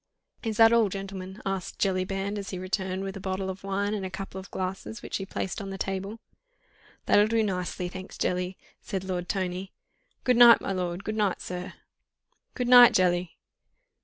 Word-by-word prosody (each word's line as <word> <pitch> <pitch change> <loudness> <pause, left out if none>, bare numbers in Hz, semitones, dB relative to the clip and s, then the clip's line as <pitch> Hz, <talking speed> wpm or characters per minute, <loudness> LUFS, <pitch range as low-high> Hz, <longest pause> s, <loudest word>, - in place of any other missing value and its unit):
"Is 220 -2 -3
that 225 0 +7
all, 230 -3 +4
gentlemen?" 195 0 -7
asked 195 -2 -3
Jellyband, 195 +1 -1
as 200 - -6
he 185 - -4
returned 185 0 -2
with 195 0 -5
a - - -6
bottle 190 0 -2
of 190 +1 -11
wine 200 +1 -1
and 205 -2 -3
a 190 - -3
couple 190 0 -6
of 190 - -11
glasses, 190 +4 -5
which - - -3
he 195 - -6
placed 190 +4 -4
on 195 - -6
the 195 - -5
table. 195 +3 -4 0.9
"That'll 205 +1 +5
do 225 0 +2
nicely, 180 -2 -2
thanks, 185 +1 -9
Jelly!" 180 +1 -1 0.2
said 190 -2 -4
Lord 180 -2 -4
Tony. 185 0 -2 0.5
"Good 250 -2 +3
night, 235 -2 +9
my - - -4
lord! 180 0 -3
Good 215 - -3
night, 205 -4 +1
sir!" 180 0 -6 0.8
"Good 250 -2 -1
night, 245 -1 +9
Jelly!" 180 -1 +1
195 Hz, 185 wpm, -27 LUFS, 185-205 Hz, 0.9 s, night